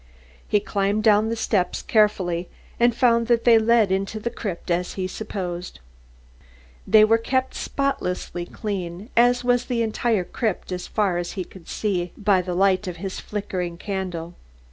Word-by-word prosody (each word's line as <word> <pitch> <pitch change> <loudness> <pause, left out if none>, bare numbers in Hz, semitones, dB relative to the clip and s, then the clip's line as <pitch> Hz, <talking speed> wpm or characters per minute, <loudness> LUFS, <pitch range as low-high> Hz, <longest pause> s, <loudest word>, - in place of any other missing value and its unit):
He 210 - +3
climbed 205 +1 -1
down 215 0 +4
the 230 - -1
steps 195 -5 0
carefully 185 -5 +1 0.3
and 240 0 +4
found 235 -2 +3
that 235 -1 +3
they 230 -2 +6
led 220 -3 +3
into 195 +3 -1
the 235 +2 -3
crypt 180 -5 -5
as 180 +1 0
he 190 - -2
supposed. 180 - -5 1.1
They 215 +2 +7
were 225 +1 +3
kept 260 +3 -1
spotlessly 180 -10 -2
clean, 195 0 -5
as 245 +1 +4
was 245 0 +2
the 235 -2 0
entire 220 -2 0
crypt 210 0 -3
as 180 0 -4
far 195 -5 0
as 175 0 -4
he 190 - -3
could 175 -1 -15
see 200 -5 -1
it 175 +4 -9
by 195 -3 +4
the 180 0 -4
light 190 +1 +2
of 180 -1 -5
his 190 +2 -5
flickering 185 -4 -4
candle. 180 -3 -4
200 Hz, 165 wpm, -23 LUFS, 180-225 Hz, 1.1 s, They